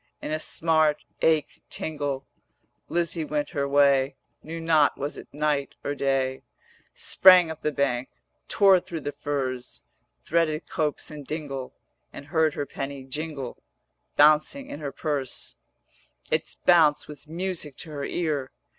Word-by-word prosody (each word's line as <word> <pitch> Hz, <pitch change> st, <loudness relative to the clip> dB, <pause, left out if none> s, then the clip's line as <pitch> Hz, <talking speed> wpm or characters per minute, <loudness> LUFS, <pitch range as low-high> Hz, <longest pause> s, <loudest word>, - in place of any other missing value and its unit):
In -, -, -5 dB
a 155 Hz, -, 0 dB
smart, 155 Hz, -2 st, +2 dB, 0.2 s
ache, 160 Hz, -2 st, +2 dB
tingle, 145 Hz, -3 st, -3 dB, 0.6 s
Lizzie 170 Hz, -1 st, 0 dB
went 150 Hz, -1 st, -2 dB
her 140 Hz, -1 st, -1 dB
way; 140 Hz, -1 st, +4 dB, 0.3 s
Knew 165 Hz, +2 st, -6 dB
not 160 Hz, -3 st, +3 dB
was 145 Hz, +2 st, -3 dB
it -, -, -9 dB
night 150 Hz, -1 st, -1 dB
or 145 Hz, -, -1 dB
day; 135 Hz, -2 st, 0 dB, 0.5 s
Sprang 180 Hz, -3 st, +6 dB
up 160 Hz, 0 st, -8 dB
the 150 Hz, -, 0 dB
bank, 135 Hz, -3 st, 0 dB, 0.4 s
tore 195 Hz, -2 st, +5 dB
thro' 170 Hz, -1 st, -6 dB
the 145 Hz, -, -4 dB
furze, 130 Hz, -4 st, -4 dB, 0.4 s
450 -, -, -24 dB
Threaded 160 Hz, -1 st, +1 dB
copse 155 Hz, -2 st, -2 dB
and 150 Hz, -1 st, -8 dB
dingle, 140 Hz, -4 st, -5 dB, 0.4 s
And 140 Hz, -, -9 dB
heard 160 Hz, 0 st, +1 dB
her 145 Hz, -, -2 dB
penny 140 Hz, -1 st, -6 dB
jingle 140 Hz, -1 st, -5 dB, 0.5 s
Bouncing 155 Hz, -, +4 dB
in 145 Hz, -, -6 dB
her 145 Hz, -2 st, -4 dB
purse, 145 Hz, -5 st, -3 dB, 0.8 s
Its -, -, -1 dB
bounce 160 Hz, -4 st, +4 dB
was 150 Hz, 0 st, -10 dB
music 170 Hz, -3 st, -3 dB
to 160 Hz, -, -7 dB
her 145 Hz, -2 st, -5 dB
ear. 150 Hz, -5 st, -1 dB
150 Hz, 145 wpm, -26 LUFS, 140-160 Hz, 0.8 s, Sprang